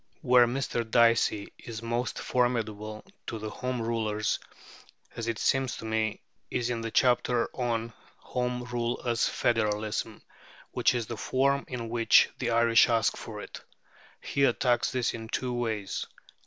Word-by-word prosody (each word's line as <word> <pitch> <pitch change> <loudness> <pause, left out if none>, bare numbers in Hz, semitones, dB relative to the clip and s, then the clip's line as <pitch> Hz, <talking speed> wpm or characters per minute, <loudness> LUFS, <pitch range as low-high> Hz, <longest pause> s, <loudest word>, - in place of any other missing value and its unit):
Where 125 -2 +6
Mr. 125 -1 -1
Dicey 115 -3 +3
is 115 -1 -8
most 120 +2 -2
formidable 110 -4 -1 0.2
to 115 - -3
the 110 0 -5
Home 125 +1 -3
Rulers, 110 -2 -1 0.8
as 115 -1 -4
it 115 -2 -1
seems 135 +1 +1
to - - -8
me, 110 -1 -1 0.3
is 125 0 -1
in 115 -1 -2
his 115 0 -4
chapter 125 -1 +3
on 115 -2 -2 0.2
"Home 125 0 -3
Rule 120 -1 -2
as 120 -1 +2
Federalism," 110 -1 -1 0.5
which - - +2
is 120 -2 -1
the 115 +1 -6
form 140 +4 +1
in 120 -3 -5
which 115 0 +4
the 120 - -1
Irish 115 +1 +5
ask 115 -2 +2
for - - -7
it. - - -9 0.6
He 140 - -1
attacks 120 +1 +2
this 125 -4 0
in 115 -1 -6
two 125 +1 -2
ways. 110 -5 -2
115 Hz, 150 wpm, -28 LUFS, 110-125 Hz, 0.8 s, Where